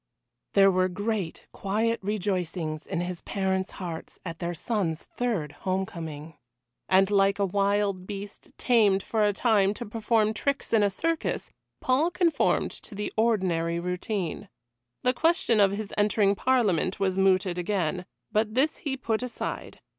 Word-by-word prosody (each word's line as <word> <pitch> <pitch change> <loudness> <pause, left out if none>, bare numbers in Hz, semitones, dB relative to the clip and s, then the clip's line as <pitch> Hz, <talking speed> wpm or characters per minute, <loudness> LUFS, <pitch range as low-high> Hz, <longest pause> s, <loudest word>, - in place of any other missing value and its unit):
There 195 -1 +6
were 185 0 +2
great 205 -2 -3
quiet 220 +4 0
rejoicings 180 -6 -2
in 180 -3 -2
his 175 -1 -4
parents' 190 -1 -1
hearts 170 -3 -6
at 165 -2 -6
their 170 0 -3
son's 175 -5 -2
third 215 - -2
homecoming. 165 -5 -4 0.6
And 190 +1 +4
like 200 0 +3
a 200 - +2
wild 200 -1 0
beast 200 0 -7
tamed 210 -6 +3
for 220 -2 0
a 205 - +4
time 205 -1 +2
to 240 - -6
perform 220 0 +1
tricks 280 +2 -2
in 220 - +5
a 205 - +4
circus, 330 - -2 0.3
Paul 270 +6 +2
conformed 345 -3 +1
to 210 - -9
the 210 +1 -4
ordinary 185 -7 +1
routine. 180 +1 -3 0.5
The 250 - +3
question 320 -6 +2
of 200 -1 +6
his 210 0 -5
entering 205 -1 +3
Parliament 200 -7 +1
was 190 -1 +1
mooted 185 -2 +2
again, 180 -1 -1 0.3
but 215 +1 0
this 290 +5 +2
he 270 -3 -3
put 225 -3 -1
aside. 250 -1 -5
200 Hz, 145 wpm, -27 LUFS, 185-220 Hz, 0.6 s, There